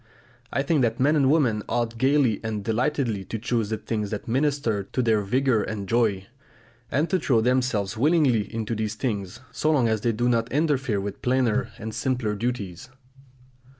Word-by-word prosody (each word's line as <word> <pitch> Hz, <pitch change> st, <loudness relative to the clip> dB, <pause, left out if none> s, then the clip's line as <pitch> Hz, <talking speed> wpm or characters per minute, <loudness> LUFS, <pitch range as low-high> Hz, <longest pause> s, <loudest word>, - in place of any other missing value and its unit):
I 140 Hz, -, 0 dB
think 150 Hz, 0 st, +2 dB
that 115 Hz, -1 st, 0 dB
men 145 Hz, +4 st, +3 dB
and 140 Hz, -3 st, +3 dB
women 130 Hz, -9 st, +2 dB
ought 115 Hz, -1 st, -1 dB
gaily 130 Hz, -4 st, +3 dB
and 110 Hz, -2 st, -3 dB
delightedly 115 Hz, -1 st, 0 dB
to 115 Hz, -, -4 dB
choose 115 Hz, -1 st, -1 dB
the 110 Hz, -, -1 dB
things 105 Hz, -1 st, -3 dB
that 105 Hz, -1 st, -5 dB
minister 130 Hz, -4 st, 0 dB
to 110 Hz, -, -6 dB
their 110 Hz, -2 st, +2 dB
vigour 125 Hz, +2 st, +1 dB
and 100 Hz, -2 st, -4 dB
joy, 110 Hz, -5 st, +1 dB, 0.6 s
and 150 Hz, +4 st, +1 dB
to 185 Hz, -, +2 dB
throw 125 Hz, -9 st, +2 dB
themselves 120 Hz, -4 st, 0 dB
willingly 135 Hz, -6 st, +2 dB
into 115 Hz, 0 st, -3 dB
these 110 Hz, -1 st, -2 dB
things, 105 Hz, -6 st, -3 dB
so 155 Hz, -, -1 dB
long 140 Hz, -7 st, +3 dB
as 110 Hz, -2 st, 0 dB
they 120 Hz, -, +1 dB
do 120 Hz, +2 st, 0 dB
not 115 Hz, -1 st, +1 dB
interfere 140 Hz, -7 st, +1 dB
with 100 Hz, 0 st, -5 dB
plainer 125 Hz, -3 st, +1 dB
and 110 Hz, +1 st, -6 dB
simpler 120 Hz, -2 st, -1 dB
duties. 105 Hz, -5 st, -4 dB
115 Hz, 180 wpm, -25 LUFS, 105-130 Hz, 0.6 s, men